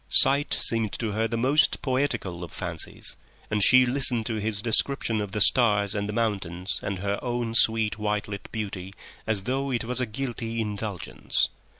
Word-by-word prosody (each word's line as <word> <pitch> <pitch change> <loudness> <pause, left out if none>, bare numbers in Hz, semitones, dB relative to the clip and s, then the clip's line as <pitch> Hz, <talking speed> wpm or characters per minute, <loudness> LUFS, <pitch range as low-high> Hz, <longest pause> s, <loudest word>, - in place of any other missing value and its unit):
Sight 140 +1 +5
seemed 115 -3 +2
to 110 -3 -3
her 110 +2 0
the 115 +1 -3
most 135 +6 +3
poetical 125 -10 -1
of 85 - -8
fancies, - - -2 0.3
and 105 -1 +2
she 130 +4 +7
listened 125 -3 +2
to 110 -1 -2
his 105 -1 -1
description 115 -1 +2
of 105 -2 -5
the 105 - -3
stars 105 -4 +3
and 100 -1 -3
the - - -1
mountains 100 -5 -1
and 100 -1 -3
her 100 +2 -2
own 120 -2 -3
sweet 110 -2 +2
white 105 -1 -1
lit 100 -1 -7
beauty 100 -3 -5 0.3
as 105 -3 0
though 135 +4 -2
it 120 -3 -1
was 125 +2 -2
a 125 - -1
guilty 115 -1 -4
indulgence. 105 -3 -2
110 Hz, 180 wpm, -26 LUFS, 100-120 Hz, 0.3 s, she